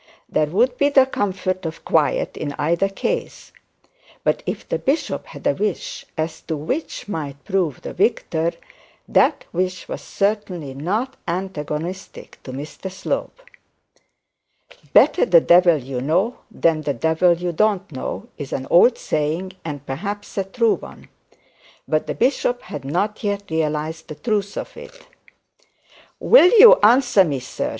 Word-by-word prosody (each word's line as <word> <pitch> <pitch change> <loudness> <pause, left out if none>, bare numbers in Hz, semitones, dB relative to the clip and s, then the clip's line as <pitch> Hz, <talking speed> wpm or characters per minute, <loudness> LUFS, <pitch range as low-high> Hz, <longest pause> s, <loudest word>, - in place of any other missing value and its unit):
There 150 - +1
would 240 - +1
be 285 - +4
the 270 -2 +5
comfort 185 -6 -2
of 160 0 -6
quiet - - +1
in 145 - -4
either 170 +6 +1
case; 475 - -4 0.7
but - - +1
if - - -4
the - - -2
bishop 280 +5 -1
had - - -12
a 285 - +3
wish 210 -6 -3
as 160 0 -3
to 160 - -2
which 230 - -4
might 145 -7 -5
prove 185 - -1
the - - -6
victor, 170 -5 0 0.5
that - - +2
wish 185 +1 -2
was - - -6
certainly 195 -8 -2
not 210 - -2
antagonistic 175 0 -5
to 130 - -9
Mr 145 +8 -7
Slope. 345 - -4 1.5
'Better - - +5
the - - +6
devil 175 - +5
you 130 -2 -5
know 185 - 0
than 165 -7 +1
the 145 -2 -2
devil 160 +7 +3
you 175 +1 -3
don't 200 +1 0
know', 130 -8 -5
is 140 -3 -6
an 130 - -3
old 235 +8 +6
saying, 155 +5 -2
and 145 -3 -6
perhaps 200 +10 -5
a 195 - 0
true 225 +4 +1
one; - - -13 0.8
but 155 0 0
the - - -3
bishop 245 -1 0
had 145 - -7
not 190 - -2
yet 200 -3 -3
realised 160 0 -2
the 155 - -7
truth 205 +3 -2
of - - -6
it. - - -13 1.1
'Will 470 -7 +7
you 475 +3 +10
answer 245 -2 +5
me, 145 -6 -2
sir?' 125 - -4
180 Hz, 150 wpm, -21 LUFS, 155-210 Hz, 1.5 s, you